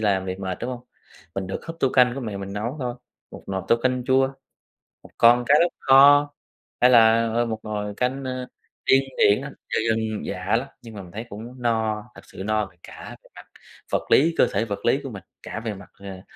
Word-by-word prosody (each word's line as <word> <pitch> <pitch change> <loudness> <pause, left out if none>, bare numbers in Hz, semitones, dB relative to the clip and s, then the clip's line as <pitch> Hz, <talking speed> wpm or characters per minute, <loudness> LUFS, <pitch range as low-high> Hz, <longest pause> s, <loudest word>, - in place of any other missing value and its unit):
làm 100 -3 +1
việc 95 0 -5
mệt, 95 -2 -4
đúng 120 - -3
hông? 125 -1 -6 0.5
Mình 95 -1 -3
được 95 - -6
húp 165 0 -7
tô 135 - +3
canh 125 -1 +4
của 135 - -5
mẹ 110 -5 -5
mình 100 0 -6
nấu 110 +7 -4
thôi, 125 -1 -3 0.4
một - - -11
nồi 95 -1 -3
tô 115 - +5
canh 125 -1 0
chua, 130 +1 +3 0.8
một - - -14
con 120 +1 +6
cá - - +4
lóc 175 - +2
kho, 145 +2 +6 0.5
hay 125 - +7
là, 115 -1 +5
ờ, 120 +1 +1
một 110 -2 -4
nồi 105 -1 -4
cánh, 130 +2 -1
ơ, 130 -1 -4 0.4
điên 135 +1 +5
điển 105 +5 +4
á, 140 +1 -7 0.2
dân - - 0 0.2
dân 110 -1 -4
dã 95 +2 -1
lắm, 130 +4 -1
nhưng 115 -2 -11
mà 100 - -7
mình 90 -2 -13
thấy 110 +4 -6
cũng 120 +5 -10
no, 110 -2 0
thật - - -12
sự 95 - -9
no 110 0 0
về 95 - -18
cả - - -10
về - - -20
mặt - - -12 0.5
vật - - -2
lý, 165 +4 +4
cơ - - +5
thể 105 +3 0
vật 100 -2 -6
lý 135 +4 +3
của 135 - -5
mình, 100 -7 -9 0.2
cả - - -6
về 115 -2 -4
mặt, 100 +1 -12
ờ, 95 -2 -10
115 Hz, 235 wpm, -23 LUFS, 100-130 Hz, 0.8 s, hay